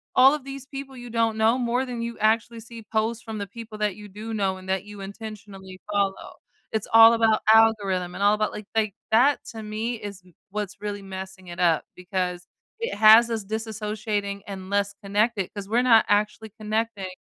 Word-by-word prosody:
all 265 +2 +7
of 295 - -8
these 275 -1 -8
people 270 -1 -8
you 245 0 -9
don't 225 -1 0
know 225 +3 +3
more 250 +1 0
than 245 -2 -5
you 235 0 -4
actually 225 +2 +1
see 230 0 -11
posts 225 +2 0
from 220 -2 -6
the 200 -1 -4
people 220 +1 -9
that 210 -3 -1
you 210 -1 -11
do 215 +3 -7
know 195 -3 0
and 185 0 -12
that 190 0 -1
you 205 -1 -11
intentionally 200 -2 -9
follow. 200 -1 -1 0.4
It's 215 -2 -1
all 225 0 +9
about 225 -2 +3
algorithm 200 -5 +3
and - - -7
all 205 - +5
about, 215 0 0
like 210 - -8
like, 215 -2 +1 0.2
that 260 +6 +5
to 220 -1 -7
me 215 +3 -3
is 205 -3 -8
m 180 - -21 0.2
what's 205 0 -5
really 205 -1 -4
messing 190 -1 -8
it 175 +1 -6
up 165 -3 +3
because 180 -1 -3 0.4
it 465 - -2
has 220 +2 +7
us 225 -3 -3
disassociating 210 -1 -3
and 190 -1 -7
less 200 0 0
connected 205 0 0
'cause 200 -1 -6
we're 235 +3 +3
not 230 -3 +6
actually 210 +1 +1
connecting 215 -2 -2
215 Hz, 200 wpm, -25 LUFS, 200-225 Hz, 0.4 s, all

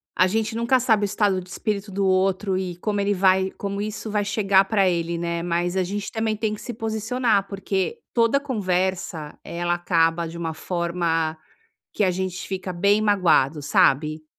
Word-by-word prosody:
a 185 - +4
gente 220 +3 -1
nunca 235 +3 +2
sabe 220 -4 +2
o - - +2
estado 200 -1 +1
de 180 - -13
espírito 205 0 -3
do 195 0 -1
outro 190 +1 +1
e 180 -2 -4
como 205 +3 -2
ele 200 0 +1
vai 190 0 +3
como 200 0 -4
isso 215 +1 -4
vai 205 -1 0
chegar 200 -1 +3
pra 200 -2 +2
ele, 170 -1 -1
né. 170 0 -2
Mas 175 +1 -1
a 190 - +2
gente 200 +3 -4
também 220 -1 -1
tem 215 0 -1
que 210 - -9
se 240 - -6
posicionar, 220 -1 0
porque 195 - -2
toda 230 +3 +3
conversa, 185 - -2
ela 175 +1 -2
acaba 170 -1 +1
de 165 - -9
uma 165 -1 -3
forma 170 -1 -1 0.6
que - - -1
a 190 - +3
gente 185 0 -4
fica 185 -1 -4
bem 200 +4 +2
magoado, 165 -8 +3
sabe? 155 +3 +2
190 Hz, 185 wpm, -23 LUFS, 175-210 Hz, 0.6 s, a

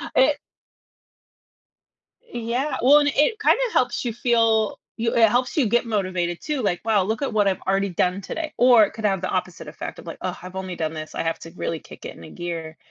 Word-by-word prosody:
It 275 +3 +4 1.8
Yeah, 245 - -3
well 280 +4 +7
and 290 -1 +2
it 300 +10 +2
kinda - - +3
helps 250 - +1
you 240 -3 -2
feel, 225 -2 +2 0.2
you 230 0 -1
it 225 -2 +6
helps 245 +2 0
you 285 - +4
get 240 +3 +2
motivated 185 -5 -1
too, 300 -3 -2
like, 185 -5 -1
"Wow, 215 -4 +3
look 220 +6 -2
at 280 - -2
what 210 -2 +3
I've 190 - 0
already 195 +1 0
done 180 +2 0
today." 315 - -5
Or, 245 -3 +7
it 205 - 0
could 220 -1 -5
have 195 -3 +1
the 185 - -2
opposite 185 -1 -3
effect - - -7
of - - -12
like, - - -6
"Ugh, - - -3
I've 185 +1 -10
only 190 -1 -4
done 160 -1 -3
this, 155 -1 -7
I - - -1
have 165 0 -2
to 165 - -10
really 165 -2 -4
kick - - -13
it - - -7
in 85 - -13
a - - -10
gear." 165 -2 -6
215 Hz, 225 wpm, -23 LUFS, 185-245 Hz, 1.8 s, well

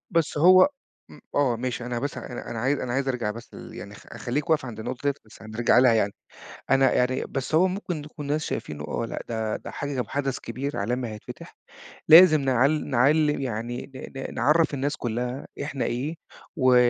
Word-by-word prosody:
بس 165 -4 0
هو 185 - +7 0.4
م - - -14 0.2
آه 135 -5 +2
ماشي، 120 0 -4
أنا 120 -1 -2
بس 140 +2 -3
أنا 120 - -7
أنا 115 - -4
عايِز 135 +4 +1
أنا 120 -1 -3
عايِز 135 +1 0
أرجَع 120 -5 -1
بس 115 +2 -10
ل - - -10
يعني - - -9
خ - - -13
خلِّيك 145 +7 -3
واقف 155 -4 +3
عند 110 -3 -7
النقطة 120 +2 -5
ديّة، 140 - +3
بس 110 - -16
هنرجع 110 +2 +2
لها 125 -2 +6
يعني. 105 -3 +2 0.6
أنا 135 -1 +4
يعني 125 +1 +1
بس 135 +3 -4
هو 175 +4 +5
ممكن 180 -5 -4
يكون 150 -1 -8
الناس 150 +1 -1
شايفينه، 75 -1 -5
آه، 115 +10 -3
لأ - - -5
ده 110 -2 -2
ده - - -9
حج 135 -5 -3
حدَث 135 -2 -2
كبير 135 +5 -5
عالمي 120 +4 -1
هيتفتَح، 105 -1 -10 0.5
لازم 160 -2 +9
نع 130 -1 +3
نعلِّم 150 +1 +2
يعني، 120 +1 -4
ن 135 - -8
ن - - -9
نعرِّف 155 0 +3
الناس 140 +2 -1
كلها 125 +3 -3 0.2
إحنا 140 -2 -3
إيه، 140 +7 -2 0.4
و 130 -1 +4
130 Hz, 195 wpm, -25 LUFS, 120-145 Hz, 0.6 s, لازم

